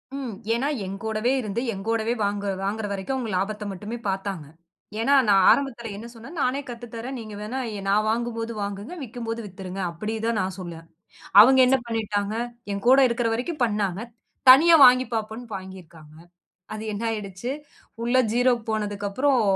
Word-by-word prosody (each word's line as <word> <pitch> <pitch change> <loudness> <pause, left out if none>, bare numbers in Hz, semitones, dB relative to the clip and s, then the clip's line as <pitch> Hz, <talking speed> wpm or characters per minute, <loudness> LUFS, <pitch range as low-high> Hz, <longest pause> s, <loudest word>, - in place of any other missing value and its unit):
ம். 260 -5 -4 0.2
ஏனா 255 +5 0 0.2
என்கூடவே 215 +5 -2
இருந்து 215 0 -3
என்கூடவே 225 +3 -1
வாங்கற 200 0 -1
வாங்கற 210 +2 -2
வரைக்கும் 200 +7 -3
அவங்க 240 -4 -3
லாபத்த 210 +3 -2
மட்டுமே 210 +5 -6
பாத்தாங்க. 190 -5 -3 0.5
ஏன்னா 255 +5 +2 0.4
ஆரம்பத்துல 235 -5 0
என்ன 230 +3 -8
சொன்னேன்? 260 +9 -11
நானே 260 +2 +1
கத்து 240 0 -7
தரேன். 250 +3 -5
நீங்க 215 -2 -8
வேணா 220 +5 -4 0.3
நா 200 - +3
வாங்கும் 235 +1 -1
போது 230 0 -3
வாங்குங்க. 200 - -5
விக்கும்போது 230 -1 -5
வித்துருங்க. 190 0 -7
அப்டி 215 +6 -4
தான் 230 -2 +1
நான் 185 0 -3
சொல்ல. 175 -2 -6 0.7
அவங்க 265 +4 +7
என்ன 265 +1 +4
பண்ணிட்டாங்க. 215 -2 -2 0.4
என்கூட 240 +7 +4
இருக்குற 235 0 0
வரைக்கு 255 +9 -3
பண்ணாங்க. 205 -3 -1 0.5
தனியா 330 +6 +8
வாங்கி 255 +1 +5
பாப்போன்னு 220 +2 -4
வாங்கி 190 0 -9
இருக்காங்க. 155 -2 -17 0.6
அது 215 - -6
என்ன 205 - -4
ஆயிடுச்சி? 210 +2 -5 0.5
உள்ள 240 +2 +1 0.2
ஜீரோக்கு 245 -1 +2
போனதுக்கப்பறம் 215 +5 0
220 Hz, 150 wpm, -24 LUFS, 200-240 Hz, 0.7 s, தனியா